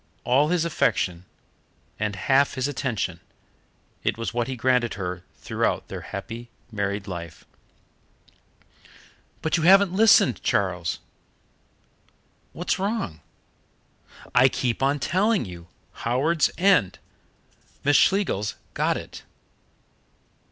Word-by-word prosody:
All 135 +4 +3
his 170 0 +1
affection 90 - 0 0.7
and 105 -1 -1
half 135 +8 +2
his 130 0 -1
attention 110 -11 -3 0.8
it - - 0
was 115 - -4
what 120 -1 -1
he 130 - -3
granted 125 -1 +1
her 90 -2 -5
throughout - - -2
their - - -6
happy 115 +4 -7 0.2
married 100 -1 -2
life. 85 -4 -8 2.0
"But 160 +1 +1
you 160 - -1
haven't 195 +1 +6
listened, 210 - +5
Charles 90 -4 0 0.8
" - - -39
"What's 175 +2 -2
wrong?" 195 - -2 1.1
"I 130 +2 +6
keep 120 -1 -2
on 140 +2 +2
telling 190 - +1
you 85 -2 -10 0.3
Howards 145 +8 +2
End. 180 - +3 0.9
Miss 145 +1 +3
Schlegels 180 - +2 0.2
got - - +1
it." - - -9
125 Hz, 110 wpm, -24 LUFS, 100-165 Hz, 2.0 s, haven't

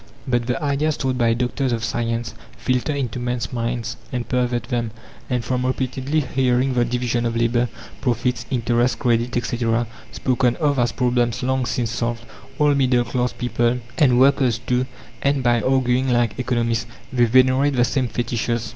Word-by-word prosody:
But 120 -2 0
the 125 -2 0
ideas 145 +2 0
taught 130 -2 -1
by 115 -1 +3
doctors 125 +2 -1
of 115 -1 -1
science 115 +1 -2 0.2
filter 130 +3 0
into 130 -5 -2
men's 120 0 -3
minds 120 0 -2
and 125 -1 -3
pervert 125 -2 0
them; 120 -2 -2 0.4
and 125 -3 -1
from 125 +2 -1
repeatedly 130 +3 -1
hearing 130 -1 +1
the 120 -1 +3
division 120 0 -1
of 115 -1 -1
labour, 120 +1 +1 0.3
profits, 120 -1 -1
interest, 120 -1 +1
credit, 120 -1 +1
etc., 120 0 0 0.3
spoken 125 -1 +1
of 145 -4 +1
as 120 -1 +2
problems 120 -1 0
long 130 -1 0
since 115 -3 -1
solved, 115 +1 -2 0.3
all 150 -1 +4
middle 130 -3 +3
class 125 0 -1
people, 120 0 0 0.2
and 125 -5 +5
workers 130 -3 +4
too, 125 +1 -1 0.3
end 140 -1 +1
by 120 -1 +3
arguing 130 +1 +2
like 120 -2 +1
economists; 115 -2 0 0.3
they 120 -1 +4
venerate 130 +4 +4
the 120 -1 +4
same 130 +1 0
fetishes. 115 -1 -2
125 Hz, 165 wpm, -22 LUFS, 120-130 Hz, 0.4 s, and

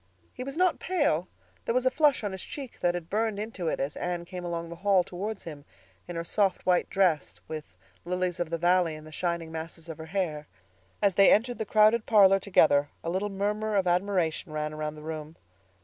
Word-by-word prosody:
He - - -6
was 275 +3 -6
not 365 -1 +3
pale; 285 - +1 0.4
there 230 - -1
was 255 0 +2
a 255 - +4
flush 290 -3 +3
on 205 - -2
his 190 -1 -6
cheek 270 -4 -8
that 175 0 +1
had 175 -2 -5
burned 215 +2 0
into 210 -5 -4
it - - -1
as 140 +2 -2
Anne 175 -1 -3
came 180 0 -7
along 170 -1 -4
the 170 - -8
hall 190 0 +3
towards 195 +4 -5
him, 150 -4 -8 0.4
in 175 - -6
her 165 - -2
soft, 195 +2 0
white 180 -1 +2
dress 180 -6 +1
with 150 -12 -8 0.3
lilies 180 0 -2
of 175 -2 -1
the 170 - -1
valley 175 -1 +2
in 155 - -10
the 155 - -12
shining 170 0 -2
masses 160 +1 -7
of 160 - -7
her 160 - -7
hair. 160 -5 -2 0.6
As 200 -2 +4
they 195 +2 +6
entered 240 +3 +2
the 220 - -3
crowded 215 +1 +4
parlor 195 -3 +6
together 145 -7 +3
a 165 - -2
little 195 +3 -1
murmur 210 +2 -1
of 195 -2 +2
admiration 180 -2 0
ran 150 0 -3
around 155 0 -4
the 150 - -11
room. 155 0 -6
180 Hz, 215 wpm, -28 LUFS, 160-205 Hz, 0.6 s, they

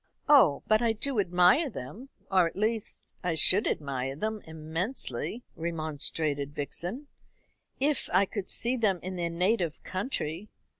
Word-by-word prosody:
"Oh, 260 - +6
but 215 +1 +3
I 230 -2 +2
do 240 +2 -1
admire 180 - +4
them; 215 - -8 0.2
or, 185 -3 +5
at - - -8
least, 220 +1 -2
I 175 -2 0
should 185 +6 +5
admire 135 -2 -2
them 215 +6 -3
immensely," 160 - -4
remonstrated 155 -3 -2
Vixen, 180 - -3 0.7
"if 285 +2 +1
I 190 +3 +4
could 195 -1 -5
see 240 +2 +1
them 200 -6 +1
in 185 +1 -5
their 170 -1 -1
native 175 -1 0
country. 185 - -4
185 Hz, 140 wpm, -29 LUFS, 160-220 Hz, 0.7 s, Oh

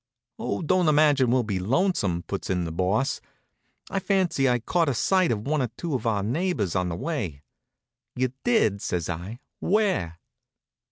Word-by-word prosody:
"Oh, 100 - -2
I - - -4
don't 180 +1 +3
imagine 145 -4 +4
we'll 125 0 +3
be 100 -4 -2
lonesome," 100 - +1
puts 100 - -5
in 90 -2 0
the 85 - -4
Boss. 95 +10 0 0.7
"I 195 - 0
fancy 180 -9 +1
I 125 - +3
caught 160 +6 +1
sight 185 - +2
of 110 -1 -2
one 150 0 +1
or 125 - +1
two 170 -3 -3
of 120 -3 -1
our 105 -3 +1
neighbors 120 - -1
on 90 -1 +1
the 85 - -3
way." 90 - -4 0.7
"You 130 0 0
did?" 110 - +2
says 85 -2 -2
I. 95 - -7 0.2
"Where?" 185 - +1
125 Hz, 170 wpm, -26 LUFS, -, 0.7 s, imagine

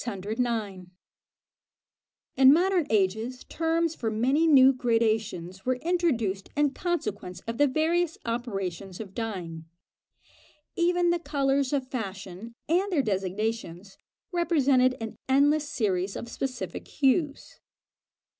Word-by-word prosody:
In 265 0 +7
modern 355 +1 +3
ages 220 +5 0
terms 330 0 0
for 230 -8 -3
many 260 +9 +2
new 270 -3 +7
gradations 220 -7 -1
were 255 0 +1
introduced 250 - -1
in 295 -1 +3
consequence 210 - -3
of 230 +1 -6
the 290 - +5
various 325 +4 0
operations 195 -6 -4
of 200 -4 -8
dyeing. 180 -8 -5 1.1
Even 350 0 +2
the 345 - 0
colours 280 -3 0
of 275 -3 -1
fashion 200 -1 -6
and 370 +5 +1
their 300 -6 +2
designations, 195 -2 -3 0.4
represented 280 -8 +2
an 225 -1 -6
endless 290 +2 +3
series 195 -6 -1
of 235 - -6
specific 240 -11 -5
hues. 280 +1 0
255 Hz, 110 wpm, -27 LUFS, 205-300 Hz, 1.1 s, In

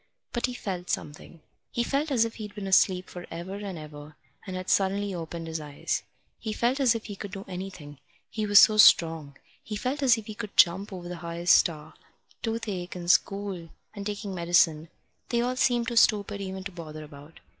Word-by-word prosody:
But 240 +1 0
he 250 - -6
felt 185 -6 -5
something. 150 +2 -5 0.3
He 240 - 0
felt 280 +5 -1
as 240 -5 +3
if 225 - -6
he'd 210 -2 -8
been 205 -2 -5
asleep 185 -1 +3
for 175 -1 -9
ever 175 +3 -6
and 200 -3 -6
ever 150 -1 -10 0.3
and 185 - -5
had 185 0 -5
suddenly 200 +1 +1
opened 165 -1 -6
his 160 0 -4
eyes. 145 -2 -3 0.4
He 220 -2 -4
felt 245 +5 +1
as 255 -4 +4
if 225 - -5
he 205 - -6
could 200 +1 -7
do 195 0 -7
anything, 180 -6 -8 0.3
he 215 -1 -3
was 205 0 +5
so 215 0 +8
strong. 160 -8 +5 0.2
He 215 - -6
felt 255 +7 -2
as 250 -4 +5
if 220 - -7
he 215 - -7
could 210 -1 -8
jump 190 +4 +4
over 180 -2 -7
the 175 0 -6
highest 170 +1 +2
star. 155 -2 +1 0.5
Toothache, 210 -6 -3
and 175 -1 +2
school, 195 -4 0 0.2
and 200 -2 -6
taking 205 -1 -4
medicine 170 -2 +2 0.4
they 235 - +1
all 250 +1 -1
seemed 240 -2 +2
too 235 - -2
stupid 205 -3 +3
even 190 -1 -5
to 195 - -6
bother 155 -3 -8
about. 150 +1 -13
190 Hz, 200 wpm, -27 LUFS, 170-215 Hz, 0.5 s, so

